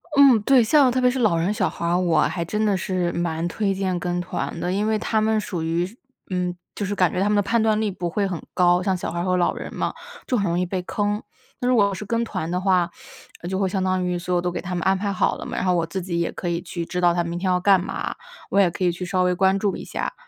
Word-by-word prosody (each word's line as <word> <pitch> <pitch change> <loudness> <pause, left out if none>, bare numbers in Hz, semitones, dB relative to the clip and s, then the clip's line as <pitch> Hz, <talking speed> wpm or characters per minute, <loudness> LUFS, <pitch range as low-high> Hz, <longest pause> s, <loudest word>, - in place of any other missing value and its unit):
嗯， 275 -6 +7
对， 260 -1 +5
像 265 +3 +5
特 255 +1 0
别 250 - +5
是 260 - -3
老 210 -8 +3
人 175 +5 +1
小 - - 0
孩 - - -6
儿， 170 +1 +2
我 175 -3 +2
还 170 -2 0
真 210 +5 -1
的 205 -2 +2
是 180 -1 -1
蛮 170 -1 -2
推 195 +3 -1
荐 190 -2 -1
跟 175 +1 -2
团 180 - -4
的。 180 - -1
因 205 +3 0
为 220 - +2
他 220 0 0
们 220 0 +2
属 180 -5 -4
于 165 +2 0
是 195 +5 -11 0.4
嗯， 180 -1 -1 0.2
是 205 0 -2
感 180 -4 +3
觉 180 - -1
他 200 - +2
们 210 - +2
的 205 - +4
判 230 +3 +1
断 220 -1 +2
力 215 -2 0
不 175 -2 -3
会 200 +4 0
很 180 -4 -4
高， 175 0 +4
像 190 0 +1
小 180 - -4
孩 170 - -3
儿 175 - -1
和 185 -1 +1
老 175 - +2
人 - - -7
嘛， - - -1 0.3
就 250 - 0
很 200 - 0
容 170 -1 0
易 180 - +1
被 180 +1 -3
坑。 205 +3 -1 0.4
那 250 - -1
如 250 - +4
果 200 -3 +3
是 200 +3 -6
跟 230 +3 0
团 185 -7 -4
的 180 +1 -1
话， 185 -2 +2 0.6
就 190 0 -1
会 195 - +2
相 190 0 -1
当 185 -1 0
于 180 0 -1
所 180 +1 -3
有 175 - +2
都 180 0 -1
给 - - -4
他 180 - -5
们 175 - -2
安 190 0 +3
排 200 +1 -2
好 190 - +1
了 - - -8
嘛， - - -5
然 - - -1
后 180 - +3
我 170 -1 +1
自 185 +3 -4
己 175 -1 -2
也 170 - 0
可 180 - -6
以 170 0 -1
去 170 -1 -5
知 180 +1 -3
道 175 -1 +4
他 175 0 0
明 170 +1 -4
天 185 - -2
要 180 - +2
干 195 +1 +5
嘛， - - -4 0.3
我 200 - +2
也 190 -3 +5
可 185 - -4
以 175 - +3
去 180 +2 -5
稍 185 0 +1
微 180 0 +2
关 190 +1 +3
注 200 -1 0
一 - - -7
下。 - - -4
185 Hz, 325 characters per minute, -23 LUFS, 175-205 Hz, 0.6 s, 嗯